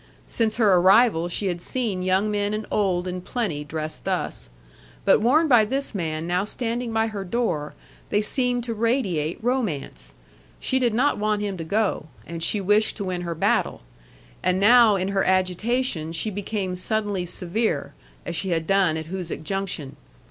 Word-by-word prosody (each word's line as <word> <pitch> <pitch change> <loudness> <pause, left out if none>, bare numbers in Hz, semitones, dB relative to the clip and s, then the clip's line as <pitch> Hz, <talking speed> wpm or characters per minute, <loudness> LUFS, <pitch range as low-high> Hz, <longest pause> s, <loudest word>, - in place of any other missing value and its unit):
Since 220 -2 -1
her 215 -4 +4
arrival 185 -1 +4
she 200 - -1
had 175 -2 -2
seen 215 -4 -2
young 190 +3 +1
men 205 0 0
and 215 0 -4
old 185 -3 +1
in 180 0 -4
plenty 180 -9 -3
dressed 155 +1 -5
thus. - - -3 0.6
But - - +5
worn 300 +8 +4
by 245 -6 +6
this 270 +5 -2
man 160 -4 -3
now 180 +2 0
standing 235 +2 -3
by 225 0 +1
her 210 -3 -4
door, 180 -8 -2 0.3
they 205 - +2
seemed 245 +2 +1
to 235 -1 -3
radiate 210 - 0
romance. 190 - -2 0.4
She 260 - 0
did 240 -4 +1
not 260 -1 +2
want 210 0 0
him 200 -2 -2
to 170 - -5
go 200 -2 -1 0.2
and 165 0 -7
she 205 +5 +1
wished 210 +3 +2
to 205 - -3
win 185 -2 -3
her 170 -1 -4
battle. 160 - 0 0.6
And 185 0 +1
now 225 +1 +6
in 190 0 -1
her 195 -1 +1
agitation 185 -1 0
she 190 +6 -1
became 200 -2 -3
suddenly 205 0 -1
severe, 180 +6 -2 0.3
as - - -4
she 190 - -1
had 165 -2 0
done 190 -3 +2
at 160 - -5
Hoosic 175 -2 -5
Junction. 190 -6 -4
195 Hz, 175 wpm, -24 LUFS, 175-225 Hz, 0.6 s, by